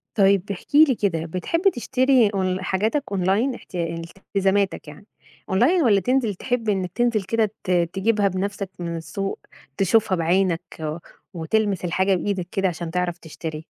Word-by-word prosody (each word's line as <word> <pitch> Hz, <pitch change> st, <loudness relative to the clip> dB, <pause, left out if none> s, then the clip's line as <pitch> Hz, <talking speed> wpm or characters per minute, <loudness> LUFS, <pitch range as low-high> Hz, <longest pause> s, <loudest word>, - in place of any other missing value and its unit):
طيب 195 Hz, -2 st, +4 dB
احكِ 195 Hz, -, -7 dB
لي 295 Hz, -4 st, +7 dB
كده، 175 Hz, -7 st, -1 dB
بتحب 185 Hz, -, -2 dB
تشتري 255 Hz, -1 st, +3 dB
أون 185 Hz, -2 st, -1 dB
حاجاتك 215 Hz, +10 st, 0 dB
أونلاين 200 Hz, +7 st, +1 dB
احتيا 170 Hz, -5 st, -5 dB, 0.2 s
التزاماتك 195 Hz, -2 st, 0 dB
يعني 150 Hz, +6 st, -12 dB, 0.4 s
أونلاين 255 Hz, -, +3 dB
والّا 210 Hz, -6 st, +4 dB
تنزل 240 Hz, 0 st, 0 dB
تحب 235 Hz, +2 st, -2 dB
إنّك 190 Hz, -3 st, -1 dB
تنزل 235 Hz, -4 st, +1 dB
كده 215 Hz, +2 st, 0 dB
ت 185 Hz, -, -2 dB
تجيبها 190 Hz, +5 st, +2 dB
بنفسك 195 Hz, +1 st, -3 dB
من 170 Hz, -1 st, -3 dB
السوق، 195 Hz, +4 st, -4 dB, 0.4 s
تشوفها 200 Hz, +1 st, +3 dB
بعينك 175 Hz, 0 st, +1 dB, 0.7 s
وتلمس 190 Hz, +2 st, 0 dB
الحاجة 190 Hz, +2 st, +2 dB
بإيدك 185 Hz, -1 st, -2 dB
كده 195 Hz, -1 st, +1 dB
عشان 170 Hz, -1 st, -4 dB
تعرف 180 Hz, 0 st, -1 dB
تشتري؟ 160 Hz, -1 st, -7 dB
195 Hz, 145 wpm, -23 LUFS, 180-220 Hz, 0.7 s, لي